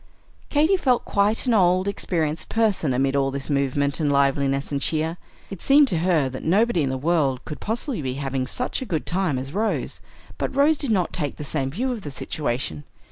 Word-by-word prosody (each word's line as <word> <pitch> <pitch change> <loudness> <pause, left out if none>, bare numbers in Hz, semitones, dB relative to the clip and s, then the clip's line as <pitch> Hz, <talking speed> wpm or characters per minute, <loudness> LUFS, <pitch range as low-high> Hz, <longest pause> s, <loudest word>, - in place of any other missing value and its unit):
Katy 315 +6 +3
felt 255 -8 +1
quite 205 +4 +1
an 245 - +2
old, 185 -2 +3
experienced 165 -5 -2
person 210 -10 +1
amid 135 +2 +1
all 135 -1 +2
this 140 +2 -5
movement 140 0 0
and 150 -2 +1
liveliness 140 0 +1
and 140 -1 -1
cheer. 160 +3 0 0.3
It 195 - -7
seemed 280 0 +5
to 170 - +1
her 165 -5 +2
that 130 0 -6
nobody 200 +2 +2
in 140 - 0
the 130 - -2
world 145 -3 0
could 150 - -7
possibly 235 - -3
be 130 -2 -3
having 135 -2 -2
such 250 - -2
a - - -3
good 165 -9 -2
time 180 -6 0
as 135 +3 -6
Rose; 220 +3 -2 0.4
but - - -2
Rose 290 +2 +4
did 280 - -1
not 190 -6 +1
take 145 -4 -2
the - - -6
same 140 -2 -2
view 245 - -2
of 235 -4 -4
the 150 - -6
situation. 120 - -3
160 Hz, 205 wpm, -23 LUFS, 140-210 Hz, 0.4 s, seemed